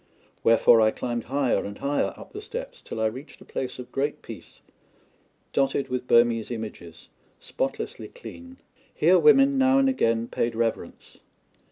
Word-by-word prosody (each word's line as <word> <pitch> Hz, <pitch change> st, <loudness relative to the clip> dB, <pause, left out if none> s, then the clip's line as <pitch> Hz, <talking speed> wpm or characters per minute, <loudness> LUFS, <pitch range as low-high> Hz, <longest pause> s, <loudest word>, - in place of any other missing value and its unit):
Wherefore 115 Hz, 0 st, +5 dB
I 110 Hz, -, +5 dB
climbed 120 Hz, +1 st, -4 dB
higher 135 Hz, 0 st, 0 dB
and 100 Hz, 0 st, -7 dB
higher 140 Hz, +1 st, -1 dB
up -, -, -13 dB
the 415 Hz, -, -7 dB
steps -, -, -7 dB
till -, -, -7 dB
I 110 Hz, -, +1 dB
reached 130 Hz, +7 st, -5 dB
a -, -, -15 dB
place 130 Hz, -1 st, -5 dB
of 125 Hz, -, -10 dB
great 145 Hz, +2 st, -2 dB
peace, -, -, -11 dB, 0.9 s
dotted 135 Hz, 0 st, 0 dB
with 125 Hz, 0 st, -3 dB
Burmese 115 Hz, -1 st, +3 dB
images, 105 Hz, -8 st, -8 dB, 0.3 s
spotlessly 410 Hz, -, -4 dB
clean. 260 Hz, -, -12 dB, 0.4 s
Here 180 Hz, +4 st, +4 dB
women 270 Hz, +7 st, +5 dB
now 265 Hz, 0 st, +4 dB
and 270 Hz, 0 st, +4 dB
again 115 Hz, -, +1 dB
paid 115 Hz, -1 st, -2 dB
reverence. 115 Hz, 0 st, -4 dB
130 Hz, 155 wpm, -25 LUFS, -, 0.9 s, Wherefore